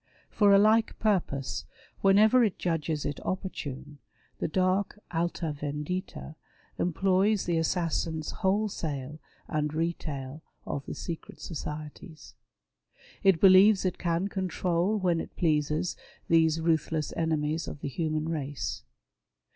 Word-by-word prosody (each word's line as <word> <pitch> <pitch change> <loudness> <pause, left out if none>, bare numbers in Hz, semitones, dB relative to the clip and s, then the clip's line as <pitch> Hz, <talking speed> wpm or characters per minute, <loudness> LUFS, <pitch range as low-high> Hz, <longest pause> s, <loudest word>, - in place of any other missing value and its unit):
For 205 -2 +4
a 200 - +8
like 215 +2 +4
purpose, 175 -11 -1 0.4
whenever 215 +5 +6
it 210 -5 0
judges 160 -3 -1
it 145 -1 -3
opportune, 145 -6 -5 0.4
the - - 0
dark 185 +4 0 0.2
Alia 165 -1 -1
Vendita 150 +5 -5 0.5
employs 190 +4 +2
the 170 -2 +1
assassins 165 -2 -1
wholesale 160 -8 -2 0.3
and 150 0 -1
retail 155 -4 -3 0.2
of 140 - -4
the - - -5
secret 170 -2 -7
societies. 155 0 -7 0.9
It 195 -4 +4
believes 195 +2 +7
it 185 - -1
can 170 +2 0
control 185 0 0
when 180 -4 +1
it - - -10
pleases 155 0 0 0.3
these 165 -1 +4
ruthless 160 -1 0
enemies 160 0 -1
of 145 - -7
the - - -3
human 155 +2 -2
race. 140 - -3
165 Hz, 115 wpm, -28 LUFS, 150-185 Hz, 0.9 s, a